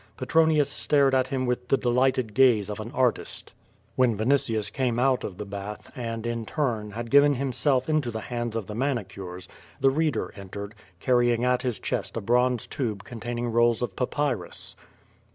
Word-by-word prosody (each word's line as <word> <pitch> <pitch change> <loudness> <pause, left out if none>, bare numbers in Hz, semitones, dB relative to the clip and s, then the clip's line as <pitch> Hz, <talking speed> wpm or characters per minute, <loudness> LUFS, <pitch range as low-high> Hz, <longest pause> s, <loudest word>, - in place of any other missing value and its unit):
Petronius 160 -3 +3
stared 140 -3 +2
at 130 -1 +3
him 130 -1 -1
with 125 0 -2
the 135 - +3
de 125 - -1
lighted 125 -2 +2
gaze 115 -6 +4
of 105 - -6
an 110 +2 -5
artist. 125 -2 -1 0.4
When 125 -4 +3
Vinitiufl 110 -3 +1
came 125 -3 0
out 130 0 +2
of 90 - -6
the 105 - -5
bath 100 +1 -7
and, 115 -3 -4
in 115 -1 -2
turn, 115 -8 -1
had 115 +3 -6
given 140 +1 +6
himself 130 0 +1
into 155 -5 +1
the 110 -1 -4
hands 120 -1 -4
of 115 -3 -2
the 105 - -7
manicures, 95 -8 -3 0.3
the 135 - +4
reader 150 -5 -1
entered, 100 +1 -7 0.3
carrying 120 0 +2
at 125 0 +2
his 125 -3 -1
chest - - -3
a - - -2
bronze 125 +2 +2
tube 110 -8 -3
containing 120 +2 -4
rolls 120 0 +3
of 120 - -3
papyrus. 125 -7 -2
120 Hz, 175 wpm, -26 LUFS, 110-130 Hz, 0.4 s, given